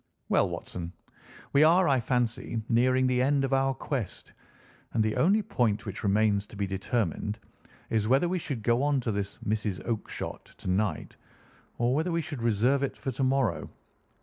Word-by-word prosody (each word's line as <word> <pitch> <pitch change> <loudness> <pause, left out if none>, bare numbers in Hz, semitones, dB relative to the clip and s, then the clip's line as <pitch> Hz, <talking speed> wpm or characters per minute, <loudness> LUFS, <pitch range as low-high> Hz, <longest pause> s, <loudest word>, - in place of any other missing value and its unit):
Well, - - +3
Watson, 85 -1 -6 0.6
we 140 - +5
are, 175 +3 +5
I 135 -2 +3
fancy, 120 -1 -1
nearing 130 +2 +3
the 125 -1 +2
end 140 +1 +2
of 135 0 0
our 135 0 +2
quest, 125 -10 -4 0.6
and 110 - +2
the 110 0 0
only 205 +6 +3
point 115 - 0
which 100 -2 -5
remains 105 0 +2
to - - -13
be 100 0 -1
determined 105 +1 -2 0.5
is 110 -2 +1
whether 135 +8 +3
we 180 +1 -1
should 130 -8 -4
go 120 +3 +2
on 145 -1 +2
to 115 - -1
this 100 -1 -3
Mrs. 105 -3 -1
Oakshott 115 -2 -5
to - - -9
night, 100 +3 -1 0.6
or 120 +1 +2
whether 160 +5 0
we 170 - +1
should 145 -6 -6
reserve 120 +5 +2
it 140 - -2
for 135 - -3
to 130 +2 -2
morrow. 130 -9 +1
120 Hz, 175 wpm, -28 LUFS, 105-135 Hz, 0.6 s, we